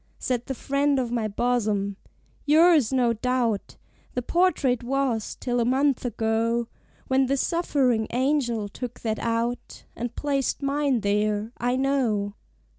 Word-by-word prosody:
Said 245 -2 -2
the 265 - -3
friend 280 +2 +1
of 250 -3 -1
my 230 -3 0
bosom, 210 -3 0 0.5
"Yours, 310 -4 +5
no 245 -3 +2
doubt, 235 -2 -1 0.4
The 250 - -1
portrait 305 -7 +2
was, 255 -3 -1
till 245 -1 -1
a - - +3
month 265 +2 +1
ago, 230 0 0 0.4
When 265 0 +2
this 275 0 +1
suffering 265 -10 +1
angel 245 -4 0
took 245 +4 -7
that 220 -2 -2
out, 235 +1 -2
And 240 +1 -5
placed 280 -1 -1
mine 275 -3 +1
there, 210 +1 0
I 245 +1 +1
know." 250 -7 0
245 Hz, 135 wpm, -25 LUFS, 225-275 Hz, 0.5 s, Yours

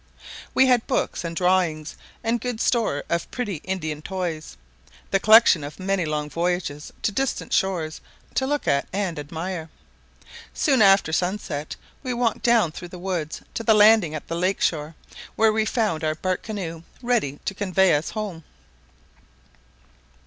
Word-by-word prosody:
We 265 - +6
had 250 -3 +3
books - - -1
and 170 -1 -4
drawings, 175 -4 +1 0.3
and 230 0 0
good 245 -2 -3
store 225 - +1
of 170 0 -2
pretty 210 -8 -3
Indian 155 -3 -4
toys, 175 -3 -4 0.5
the 195 - +3
collection 215 -7 +6
of 145 +5 -8
many 190 -1 0
long 150 -1 -2
voyages 170 -2 -2
to - - +1
distant 270 +5 -2
shores, 170 -5 0 0.3
to 265 - 0
look 290 +1 -1
at 140 0 +2
and 190 -5 -2
admire. 165 +3 -5 0.9
Soon 270 -6 +3
after 195 -5 +5
sun 180 +5 +1
set 150 -6 -5 0.3
we 255 -3 -3
walked 235 -2 0
down 230 -8 +3
through 175 - -8
the 180 - -10
woods 175 -4 -4
to - - -3
the 225 -1 +4
landing 210 -6 +6
at 155 - -7
the - - -4
lake 185 +3 0
shore, 155 0 -1 0.4
where 220 -1 +4
we 220 0 +1
found 215 -8 0
our 155 0 0
bark 185 +2 -2
canoe 180 -7 -5 0.2
ready 225 - 0
to - - -1
convey 190 -2 +2
us 150 +2 0
home. 205 -7 -5
185 Hz, 160 wpm, -24 LUFS, 160-215 Hz, 0.9 s, We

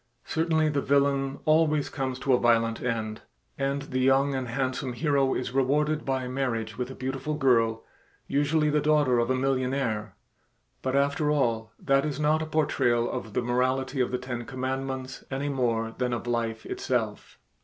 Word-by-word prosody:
Certainly 160 -1 +1
the 145 -2 0
villain 140 -1 +1
always 155 -2 +3
comes 130 -2 -3
to 135 0 +1
a 125 - +4
violent 115 -1 +2
end, 110 -3 -2 0.3
and 140 0 -1
the 130 -2 -3
young 135 +2 +3
and 130 -2 -2
handsome 130 +1 -2
hero 140 -1 +1
is 125 - -3
rewarded 150 +3 +1
by 130 -2 -1
marriage 125 -4 -2
with 125 0 -3
a 130 - -8
beautiful 135 +3 -3
girl, 115 -6 +2 0.4
usually 150 +2 +1
the 150 0 +2
daughter 145 -5 +3
of 120 +1 +1
a 130 - +2
millionaire, 130 -5 -1 0.7
but 130 0 -1
after 140 +2 +2
all 115 -6 0
that 135 0 +2
is 150 -1 -3
not 155 +1 +2
a 160 - -3
portrayal 120 -6 +1
of 110 - -5
the - - 0
morality 130 +2 0
of 125 - +1
the 125 - -1
ten 125 -1 -5
commandments 130 +1 -4
any 140 +2 -2
more 115 -4 0
than 125 -1 -1
of 120 - -3
life 115 -2 -2
itself. - - -3
130 Hz, 170 wpm, -27 LUFS, 120-140 Hz, 0.7 s, a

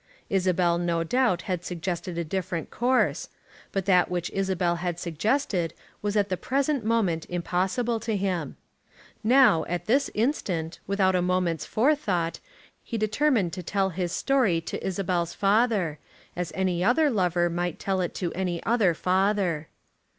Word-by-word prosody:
Isabel 180 -3 +2
no 170 -1 0
doubt 220 -2 +1
had 180 -4 -3
suggested 175 0 -4
a 170 - 0
different 175 0 -3
course. 250 +2 +1 0.4
But 195 -2 -2
that 180 -2 +4
which 180 -1 -2
Isabel 185 -3 0
had 175 0 -3
suggested 175 - -1 0.3
was 205 0 -1
at 205 -1 +2
the 185 - -1
present 275 - 0
moment 205 -8 0
impossible 185 +7 -1
to 220 0 -2
him. 180 -7 -2 0.7
Now, 240 -8 +5
at 175 0 -3
this 270 +6 +2
instant, 190 - -1
without 195 -1 +2
a 180 - +2
moment's 180 -3 0
forethought, 215 - +1 0.4
he 230 - -4
determined 215 - +1
to 185 - -4
tell 195 +2 0
his 175 0 -2
story 240 -11 +2
to - - -6
Isabel's 180 -3 -1
father, 200 -6 +2 0.4
as 175 -2 -3
any 185 -2 0
other 285 +8 +3
lover 180 -5 +2
might 175 0 -2
tell 190 -1 -1
it 175 - -3
to 175 -3 -2
any 180 -2 -2
other 215 -8 +2
father. 185 -3 +1
185 Hz, 150 wpm, -26 LUFS, 175-215 Hz, 0.7 s, Now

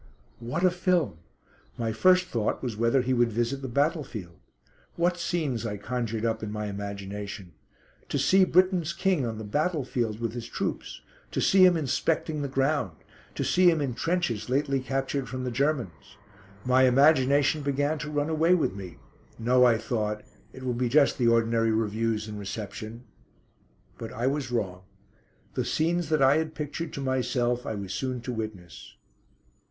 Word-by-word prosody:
What 120 +9 -3
a 185 - +5
film! 180 - 0 0.6
My 115 -2 -1
first 185 +10 +4
thought 115 -10 -2
was 120 -4 -3
whether 115 +4 +2
he 130 +1 0
would 120 -1 +2
visit 120 +5 -1
the 135 - -4
battlefield. 125 - -2 0.6
What 175 +1 +1
scenes 155 -9 -1
I 105 -3 -3
conjured 115 +1 -3
up 115 -1 -1
in 110 -1 -4
my 105 0 -3
imagination. 100 -1 -6 0.6
To - - 0
see 190 0 +4
Britain's 185 -2 +2
King 180 -7 +1
on 110 -1 -4
the 110 - -6
battlefield 125 - -1
with 115 -2 -2
his 120 -1 -6
troops; - - -4 0.3
to - - -3
see 190 -1 +5
him 180 -2 +6
inspecting 155 +1 -1
the 140 - -2
ground; 135 - 0 0.4
to - - -1
see 180 0 +4
him 165 -2 +2
in 135 -4 -1
trenches 125 - -1
lately 135 +1 +1
captured 135 0 -2
from 130 +2 -4
the 125 - -2
Germans. 125 - -2 0.5
My 130 +1 +5
imagination 140 +2 +4
began 145 +2 0
to 150 - -5
run 145 0 -1
away 160 +3 +3
with 160 - 0
me. 95 -3 -9 0.4
No, 125 +2 +4
I 120 -2 +5
thought, 105 -2 -2 0.3
it 130 - -11
will 125 -1 -1
be 120 0 -1
just 140 +2 +3
the 120 - +3
ordinary 115 0 +3
reviews 110 0 -1
and 105 -1 -6
reception. 110 +3 -6 1.0
But 115 0 -6
I 120 - -2
was 135 -1 0
wrong. 95 -7 -2 0.7
The - - -1
scenes 165 0 0
that 155 -3 +3
I 135 +3 +5
had 160 0 -2
pictured 150 +2 -4
to 140 - -5
myself 125 -2 0
I 110 - -2
was 100 -2 -5
soon 130 -2 -2
to 125 +1 -4
witness. 110 -7 -7
125 Hz, 170 wpm, -27 LUFS, 110-150 Hz, 1.0 s, him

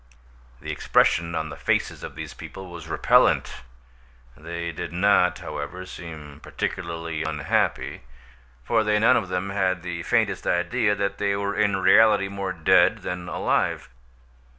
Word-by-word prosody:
The - - -5
expression 85 0 +2
on 80 -1 -2
the 75 - -7
faces - - -1
of - - -8
these - - -7
people 95 -2 -10
was 85 -2 -9
repellent; 80 - +3 0.8
they 85 +2 -5
did 80 - -6
not, 90 0 +3
however, 75 +1 -6
seem 80 -5 -10
particularly 85 -2 -4
unhappy, 80 -1 -1 0.6
for 110 - +2
they 105 -1 +2
none 115 +4 +5
of 100 -7 -1
them 95 +2 -2
had 95 -3 0
the 85 -1 -4
faintest - - 0
idea 105 +5 +1
that 100 0 -2
they 100 -1 +1
were 100 0 -2
in 100 -1 +2
reality 100 +1 +5
more 100 -1 -4
dead 80 -3 +3
than 90 0 -5
alive. - - -1
90 Hz, 145 wpm, -24 LUFS, 85-100 Hz, 0.8 s, none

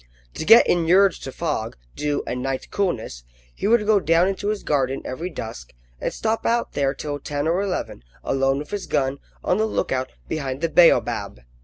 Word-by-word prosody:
To - - -5
get 230 +6 +8
inured 180 +3 +4
to 135 - -6
fog, 145 -8 -3 0.2
dew, 150 -1 -1
and 125 - -3
night 135 0 -4
coolness, 115 - -2 0.3
he - - -3
would 225 -1 +3
go 210 -1 +4
down 170 0 +3
into 195 +1 -2
his 210 -1 -2
garden 135 -2 0
every 160 +8 -4
dusk, 110 - -8 0.3
and - - -2
stop 225 0 -2
out 235 0 0
there 140 -1 0
till 145 0 -4
ten 145 +2 -3
or 175 +4 +1
eleven, 185 - -3 0.2
alone 135 0 +1
with 150 +1 -7
his 205 -2 -4
gun, 135 0 0 0.2
on 180 - +1
the 220 - +2
lookout, 130 -10 -2 0.2
behind 140 -3 -3
the 165 - +1
baobab. 165 - +3
155 Hz, 185 wpm, -23 LUFS, 135-195 Hz, 0.3 s, get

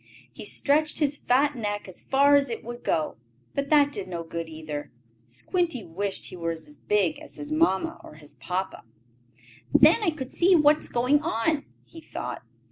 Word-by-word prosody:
He - - -8
stretched 300 +2 +1
his 290 -2 +1
fat 285 +2 +2
neck 205 -4 -3
as 185 - -9
far 280 +1 +4
as 280 -2 +3
it 230 - -4
would 240 +1 -8
go, 155 -5 0 0.4
but 280 0 -2
that 290 -2 +5
did 200 -8 -5
no 170 -2 -4
good 165 0 -5
either. 155 -2 -6 0.4
Squinty 285 - -1
wished 195 +4 -3
he - - -8
were 165 -1 -3
as 155 -2 -11
big 210 - 0
as 310 - -12
his 295 0 -8
papa 310 -12 +1
or - - -12
his 150 -1 -15
mamma. 185 +1 -3 0.9
"Then - - +6
I 405 - +2
could 270 -5 -6
see 360 +2 +4
what 300 -1 +5
is - - -7
going 255 +5 +2
on," 305 0 0 0.2
he 330 - -13
thought. - - -6
250 Hz, 185 wpm, -26 LUFS, 180-295 Hz, 0.9 s, Then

